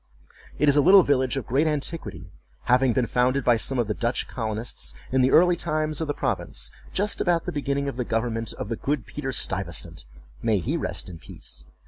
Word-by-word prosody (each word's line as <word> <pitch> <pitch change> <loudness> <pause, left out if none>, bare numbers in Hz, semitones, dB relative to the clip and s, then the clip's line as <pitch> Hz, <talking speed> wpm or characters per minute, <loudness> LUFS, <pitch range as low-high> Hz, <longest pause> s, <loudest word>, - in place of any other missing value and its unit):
It 150 - +2
is 145 - +5
a 145 - +6
little 190 +5 +8
village 130 -2 +1
of 135 - -3
great 140 +6 +2
antiquity, 135 - -4 0.3
having 125 +1 +3
been 125 +1 +1
founded 130 +3 +1
by 120 -1 +4
some 130 +4 -2
of 120 - +2
the 105 - -1
Dutch 120 +3 -1
colonists, 110 - -4 0.2
in 130 0 +3
the 130 - +4
early 175 +5 +5
times 155 -2 -1
of 160 - -1
the 145 - 0
province, - - -2 0.2
just 205 +2 +1
about 170 -2 +1
the - - -2
beginning 140 -1 -1
of 140 - -4
the 125 - 0
government 115 -1 -1
of - - -6
the 115 - -2
good 140 -4 -2
Peter 135 -2 -5
Stuyvesant, 95 - -2 0.4
(may 110 -2 +2
he 90 - -1
rest - - -2
in 85 -3 -9
peace!) - - -8
130 Hz, 205 wpm, -25 LUFS, 115-145 Hz, 0.4 s, little